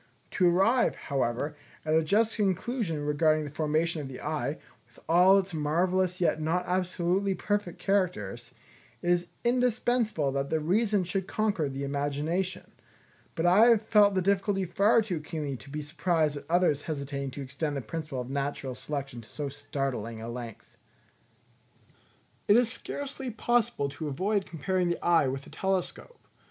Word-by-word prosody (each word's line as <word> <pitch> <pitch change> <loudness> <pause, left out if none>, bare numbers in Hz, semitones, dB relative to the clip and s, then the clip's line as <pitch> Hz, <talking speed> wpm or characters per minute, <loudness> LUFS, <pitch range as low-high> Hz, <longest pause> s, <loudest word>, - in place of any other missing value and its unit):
To 180 -1 +3
arrive, 195 +8 +3
however, 140 +2 -2 0.3
at 155 - +1
a 160 0 +4
just 215 +7 +2
conclusion 195 - -1
regarding 155 +1 +2
the 145 - -7
formation 155 +2 0
of 140 - -6
the 130 -1 -8
eye, 150 -1 -2 0.3
with - - -25
all 180 +4 +6
its 195 -1 -1
marvellous 180 +4 +1
yet 165 -3 +1
not 165 +4 0
absolutely 185 +1 0
perfect 205 -2 -2
characters, 125 - -1 0.5
it 175 - +2
is 175 0 +1 0.2
indispensable 240 - +1
that 140 0 -2
the 160 - +1
reason 200 +5 +2
should 185 +1 -2
conquer 200 -9 0
the 135 +1 -5
imagination; 145 +6 -2 0.6
but 165 - -1
I 195 +6 +6
have 230 -3 +5
felt 210 -2 +5
the 185 - +1
difficulty 195 0 +1
far 210 +6 +3
to 185 -6 -3
keenly 150 -3 -4
to 120 - -14
be 150 +1 -4
surprised 155 0 0
at 145 - -9
others 170 -4 +3
hesitating 140 -3 -4
to - - -4
extend 140 +2 -3
the - - -2
principle 140 +2 -5
of 125 - -7
natural 140 -1 -2
selection 135 -3 -5
to 110 - -17
so 145 -2 -4
startling 135 -5 -4
a 115 - -6
length. 120 -2 -9 1.7
It 205 - +6
is 240 -2 +3
scarcely 275 -2 -5
possible 230 -9 +1
to 155 +2 -6
avoid 190 +8 0
comparing 180 +2 -1
the 175 - -3
eye 165 -5 +4
with 135 +1 -3
a - - -14
telescope. 190 - -3
165 Hz, 160 wpm, -28 LUFS, 145-195 Hz, 1.7 s, all